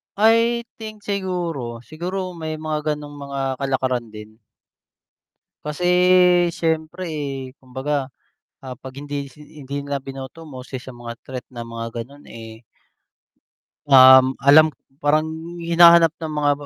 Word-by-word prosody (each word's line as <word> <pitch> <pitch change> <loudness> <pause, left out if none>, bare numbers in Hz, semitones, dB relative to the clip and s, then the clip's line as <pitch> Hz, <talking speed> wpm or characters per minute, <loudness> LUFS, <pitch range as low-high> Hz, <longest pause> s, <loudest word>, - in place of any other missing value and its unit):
I 230 +3 +3 0.2
think 215 -2 -9
siguro, 170 - -3
siguro 180 - -5
may 160 -2 -5
mga 155 -1 -2
gano'ng 145 0 -10
mga 140 0 -5 0.2
kalakaran 130 -3 -1
din. 110 0 -12 1.3
Kasi 150 +4 -3 0.7
syempre, 160 +2 -2
eh, 140 -4 -5
kumbaga, 135 +2 -3 0.6
ah, 130 -2 -8
'pag 130 +2 -10
hindi, 145 -1 -4
si 150 - -19
i 150 +1 -14
'di 140 +2 -4
nila 140 0 -2
binoto 135 +4 -9
mo, 135 -5 -9
isa 130 +1 -8
sa 130 +1 -9
mga 120 -1 -8
threat 130 -1 -7
na 120 -2 -8
mga 115 0 -6 0.2
ganun, 140 +4 -17
eh. 115 0 -11 1.3
Um, 130 -1 +8
alam 155 +2 +6 0.2
parang 155 +2 +1 0.3
hinahanap 170 -1 +6
ng 160 -2 -5
mga 145 -1 +2
145 Hz, 135 wpm, -21 LUFS, 130-160 Hz, 1.3 s, Um